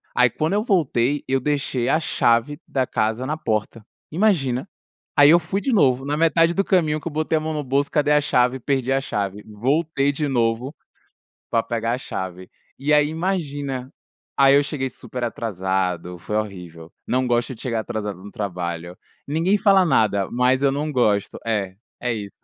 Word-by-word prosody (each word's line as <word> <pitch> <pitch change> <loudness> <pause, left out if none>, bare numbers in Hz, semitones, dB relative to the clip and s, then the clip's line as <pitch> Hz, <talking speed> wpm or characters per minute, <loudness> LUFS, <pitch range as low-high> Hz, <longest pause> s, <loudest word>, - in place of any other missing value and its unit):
Aí 125 -1 +5
quando 155 - -1
eu 210 +1 +1
voltei 145 - +1
eu 135 0 +1
deixei 135 -3 -1
a 155 - +3
chave 120 0 +1
da 130 -1 0
casa 110 +3 -1
na 155 +4 -2
porta. 110 -2 -3 0.3
Imagina? 150 - +1 0.5
Aí 145 0 +8
eu 170 - +7
fui 175 +4 -3
de 265 - -1
novo 135 - +3
na 145 +1 -1
metade 165 +1 +3
do 195 - +1
caminho 155 -6 +2
que 160 - -4
eu 160 - -11
botei 155 +1 0
a - - +1
mão 160 +1 -3
no 150 -1 -3
bolso 140 +2 0
cadê 150 -1 +2
a 150 - +5
chave? 125 -2 +1
Perdi 135 0 0
a 135 - +2
chave, 100 -5 -3
voltei 140 +6 0
de 150 +1 -2
novo, 120 +2 0 0.8
pra 115 -1 +2
pegar 115 0 -2
a 125 - -3
chave, 95 -6 -6 0.3
e 145 +3 0
aí 150 0 +4
imagina, 145 -6 -3 0.5
aí 135 0 +6
eu 145 - +5
cheguei 140 -2 -3
super 125 -1 -6
atrasado, 95 -5 -2
foi 105 +5 -4
horrível, 90 -6 -6
não 130 +1 +1
gosto 120 +1 0
de 110 - -13
chegar 115 -3 -1
atrasado 105 -5 -5
no 105 - -10
trabalho, 90 -5 -4 0.3
ninguém 165 +7 +1
fala 195 -2 +5
nada, 100 - +2
mas 125 +2 +2
eu 140 - +4
não 150 +2 -2
gosto, 105 -6 +1
é, 100 -4 -1 0.3
é 125 -1 -1
isso. 100 -3 -6
130 Hz, 185 wpm, -22 LUFS, 110-150 Hz, 0.8 s, Aí